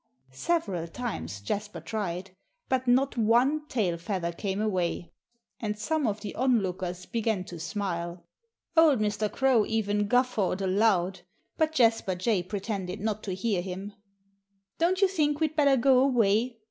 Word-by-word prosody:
Several 190 - -1
times 165 - -5
Jasper 200 - -4
tried. 180 +1 -4 0.4
But 260 -1 0
not 255 +1 +3
one 250 +7 +3
tail 185 - -1
feather 175 -1 -2
came 195 +3 -3
away. 185 -5 -1 0.5
And 210 -2 -3
some 300 +5 0
of 210 0 -2
the 205 -2 -5
onlookers 185 -8 0
began 225 -4 -1
to 175 -2 -9
smile. 175 -1 -4 0.5
Old 320 -4 +6
Mr. 210 0 -1
Crow 265 -5 +3
even 205 -2 0
guffawed 245 -6 +1
aloud. 190 -1 +2 0.4
But 315 -1 +1
Jasper 225 -8 +3
Jay 190 +1 +1
pretended 195 0 -4
not 215 0 -2
to 190 -3 -3
hear 195 -1 0
him. 190 +3 -6 0.9
"Don't 365 +3 +2
you - - +7
think 300 -6 0
we'd 310 -1 0
better 280 -3 +4
go 260 +1 +5
away?" 235 -2 +2
210 Hz, 145 wpm, -28 LUFS, 185-250 Hz, 0.9 s, you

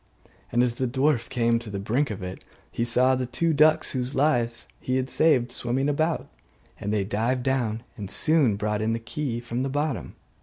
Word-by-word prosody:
And 120 - +3
as 120 -2 +1
the 130 +2 -1
dwarf 130 0 +1
came 115 -2 +2
to 115 -2 -9
the 100 - -4
brink 120 +8 0
of 100 -3 -5
it, 90 +1 -7 0.3
he 115 - -1
saw 125 +2 +3
the 130 -1 -1
two 165 +6 0
ducks 155 +2 +4
whose 130 0 -2
lives 120 -5 +1
he 130 - -2
had 130 0 -1
saved 135 -7 +3
swimming 125 +3 -1
about; 155 +3 0 0.5
and 105 - -3
they 105 -2 +1
dived 115 +6 -1
down 120 -4 0
and 100 -3 -6
soon 145 0 +3
brought 105 +1 -1
in 110 +1 +1
the - - 0
key 120 +1 -3
from 120 +1 -4
the 135 - -1
bottom. 145 -2 -2
125 Hz, 200 wpm, -25 LUFS, 115-135 Hz, 0.5 s, ducks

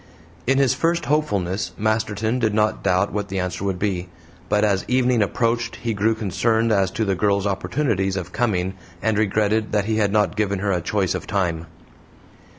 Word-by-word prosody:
In 135 +1 +3
his 135 -2 +4
first 165 +5 0
hopefulness 100 - 0
Masterton 110 +2 0
did 110 -3 +1
not 105 0 +1
doubt 95 +2 +1
what 105 0 -2
the 95 - -4
answer 90 +1 -3
would 95 -2 -1
be, 90 -2 -2 0.4
but 105 0 +2
as 100 -3 +2
evening 125 -2 +2
approached 115 +3 0
he 115 -2 -3
grew 110 +2 +1
concerned 110 +2 +1
as 95 -3 +3
to 110 +3 -2
the 100 - +1
girl's 100 +2 +1
opportunities 95 0 0
of 90 -1 -5
coming, 95 -6 0 0.3
and 110 -1 +2
regretted 110 +1 +1
that 105 -2 +2
he 110 0 0
had 105 -2 +2
not 105 0 +2
given 100 -2 0
her 100 +1 -1
a 90 -2 0
choice 95 +1 0
of - - -5
time. 85 -4 -1
105 Hz, 185 wpm, -22 LUFS, 95-110 Hz, 0.4 s, his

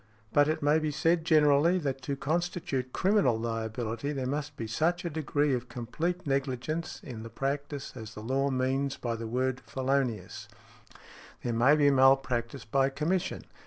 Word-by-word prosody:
But 145 0 +5
it 155 -1 -1
may 150 +2 +4
be 155 -1 -1
said 165 +3 +1
generally, 155 +2 +5
that 135 -6 -2
to 140 +2 -3
constitute 155 -4 -2
criminal 185 - +3
liability 115 +2 -3
there 135 -2 -3
must 145 +2 -3
be 115 - -4
such 165 - 0
a 170 - -2
|56| - - -12
degree 145 -2 +1
of 125 0 -3
complete 165 +10 -3
negligence 140 +3 -2
in 120 -4 -7
the 115 - -8
practice 140 +3 -3
as 110 -2 -8
the 105 - -8
law 135 +4 +1
means 135 +1 0
by 120 -2 -2
the 115 0 -5
word 130 +2 -1
felonious. 125 -6 -2 1.0
There 120 - -1
may 125 +6 +5
be 145 -2 +4
malpractice 130 -2 +3
by 135 +5 +2
commission, 160 +7 -1
_i. - - -28
135 Hz, 170 wpm, -29 LUFS, 120-150 Hz, 1.0 s, But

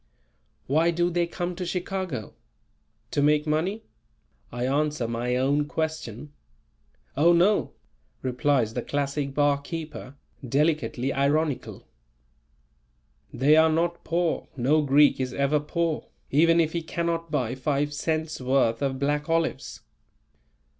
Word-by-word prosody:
"Why 160 +5 +2
do 175 +1 +1
they 175 0 +1
come 175 +1 -4
to 185 - -4
Chicago? 180 - -4 0.8
To 145 - +1
make 150 +1 +3
money?" 170 +8 -1 0.7
I 120 +1 -3
answer 145 -2 0
my 120 +2 -1
own 140 +3 +1
question. 155 -5 -4 0.8
"Oh, 165 +5 +5
no!" 185 +5 +3 0.5
replies 130 -3 +1
the 125 - -2
classic 140 +1 -2
barkeeper, 145 -1 -2 0.3
delicately 135 -1 0
ironical. 145 +1 -1 1.4
"They 145 +4 +4
are 160 0 +5
not 170 +2 0
poor, 170 0 -1
no 140 +5 +3
Greek 145 0 +4
is 130 -1 -3
ever 140 +2 +2
poor, 160 +1 -2 0.2
even 165 +4 +4
if 160 -1 +1
he 170 - -1
cannot 165 0 -2
buy 125 -6 -1
five 145 +2 -1
cents' 155 0 -2
worth 125 -3 +1
of 135 -1 -1
black 145 +2 -1
olives." 165 0 -1
150 Hz, 120 wpm, -26 LUFS, 135-165 Hz, 1.4 s, Oh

